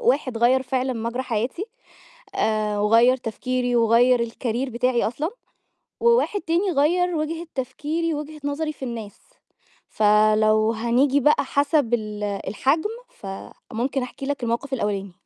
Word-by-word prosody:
واحد 255 Hz, -2 st, +1 dB
غيّر 255 Hz, +3 st, +4 dB
فعلًا 260 Hz, 0 st, -1 dB
مجرى 235 Hz, +2 st, -3 dB
حياتي، 245 Hz, -, -2 dB, 0.7 s
آآ 215 Hz, -1 st, 0 dB
وغيّر 230 Hz, +5 st, +5 dB
تفكيري 245 Hz, +1 st, -2 dB
وغيّر 235 Hz, +1 st, +4 dB
الcareer 245 Hz, +2 st, -3 dB
بتاعي 245 Hz, +1 st, +1 dB
أصلًا، 300 Hz, +8 st, -3 dB, 0.7 s
وواحد 470 Hz, -3 st, +3 dB
تاني 340 Hz, +4 st, 0 dB
غيّر 345 Hz, +5 st, +2 dB
وجهة 325 Hz, +2 st, -3 dB
تفكيري 305 Hz, +5 st, -2 dB
ووجهة 300 Hz, +1 st, -6 dB
نظري 305 Hz, +2 st, -2 dB
في 270 Hz, -, -8 dB
الناس، 225 Hz, -4 st, -7 dB, 0.7 s
فلو 215 Hz, +1 st, +3 dB
هنيجي 245 Hz, +5 st, +2 dB
بقى 295 Hz, +1 st, +3 dB
حسب 285 Hz, -3 st, +1 dB
ال 210 Hz, -2 st, -3 dB
الحجم 260 Hz, -, -1 dB, 0.2 s
فممكن 235 Hz, -, -5 dB
أحكِي 255 Hz, +2 st, -7 dB
لك 285 Hz, -2 st, -3 dB
الموقف 235 Hz, +4 st, -2 dB
الأولاني. 200 Hz, -5 st, -2 dB
250 Hz, 125 wpm, -23 LUFS, 225-285 Hz, 0.7 s, وغيّر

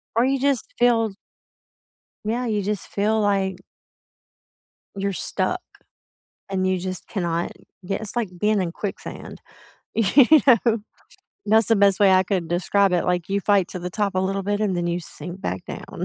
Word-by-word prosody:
Or, 235 Hz, -, +4 dB
you 270 Hz, 0 st, +1 dB
just 275 Hz, -2 st, +1 dB
feel 230 Hz, -3 st, +3 dB, 1.1 s
Yeah, 240 Hz, +3 st, -1 dB
you 215 Hz, -3 st, 0 dB
just 205 Hz, -1 st, -3 dB
feel 215 Hz, +2 st, +1 dB
like 195 Hz, -2 st, +1 dB, 1.4 s
you're 200 Hz, 0 st, -2 dB
stuck. -, -, -1 dB, 0.9 s
And 190 Hz, -1 st, -1 dB
you 185 Hz, -1 st, +1 dB
just 185 Hz, 0 st, -4 dB
cannot 170 Hz, -4 st, -2 dB, 0.3 s
get 195 Hz, +3 st, -2 dB
it's 220 Hz, +2 st, -5 dB
like 230 Hz, -5 st, 0 dB
being 210 Hz, -1 st, +2 dB
in 170 Hz, -2 st, -2 dB
quicksand. 200 Hz, 0 st, -7 dB, 0.5 s
You 235 Hz, +4 st, +5 dB, 0.2 s
know? 235 Hz, -3 st, +4 dB, 0.7 s
That's 220 Hz, +1 st, +4 dB
the 225 Hz, -, +4 dB
best 200 Hz, 0 st, +4 dB
way 195 Hz, -2 st, +6 dB
I 185 Hz, 0 st, +4 dB
could 180 Hz, -4 st, -2 dB
describe 190 Hz, +2 st, +2 dB
it, 175 Hz, -, +1 dB
like, 180 Hz, -1 st, -1 dB
you 200 Hz, +1 st, 0 dB
fight 200 Hz, -2 st, +2 dB
to 180 Hz, -, -6 dB
the 180 Hz, +1 st, -4 dB
top 200 Hz, 0 st, -1 dB
a -, -, +1 dB
little 195 Hz, +1 st, -1 dB
bit 205 Hz, +1 st, -1 dB
and 195 Hz, -4 st, 0 dB
then 175 Hz, -, -1 dB
you 175 Hz, +1 st, -1 dB
sink 175 Hz, +3 st, -8 dB
back 95 Hz, -, -4 dB
down, -, -, -6 dB
200 Hz, 170 wpm, -23 LUFS, 185-215 Hz, 1.4 s, way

